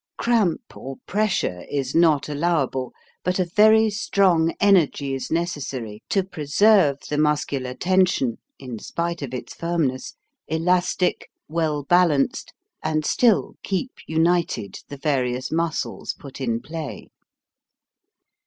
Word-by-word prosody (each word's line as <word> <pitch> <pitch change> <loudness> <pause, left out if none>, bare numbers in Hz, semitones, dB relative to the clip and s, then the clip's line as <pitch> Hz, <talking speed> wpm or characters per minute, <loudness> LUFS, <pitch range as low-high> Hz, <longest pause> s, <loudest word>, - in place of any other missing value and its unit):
Cramp 225 -8 0
or 135 +1 -7
pressure 200 - 0
is 135 -2 -2
not 160 -4 +3
allowable, 145 -4 -1 0.3
but 180 0 0
a 185 - +1
very 215 +4 +5
strong 185 -5 +2
energy 170 -9 +3
is 135 - -4
necessary 135 -10 -3
to 195 - +2
preserve 180 -1 +3
the 150 - -1
muscular 145 -4 0
tension 180 -8 +1 0.2
in 125 -5 -7
spite 170 +5 -3
of 135 -4 -5
its 125 -1 -6
firmness 165 -7 -2 0.3
elastic, 180 +3 0 0.2
well 155 -2 -1
balanced, 170 -4 +2 0.3
and 155 -1 -1
still 230 +2 +3
keep 200 +6 -2 0.2
united 160 - 0
the 145 - -7
various 130 -3 -1
muscles 165 0 -2
put 135 -1 -10
in 115 -3 -1
play. 155 - -7
160 Hz, 115 wpm, -23 LUFS, 135-180 Hz, 0.3 s, very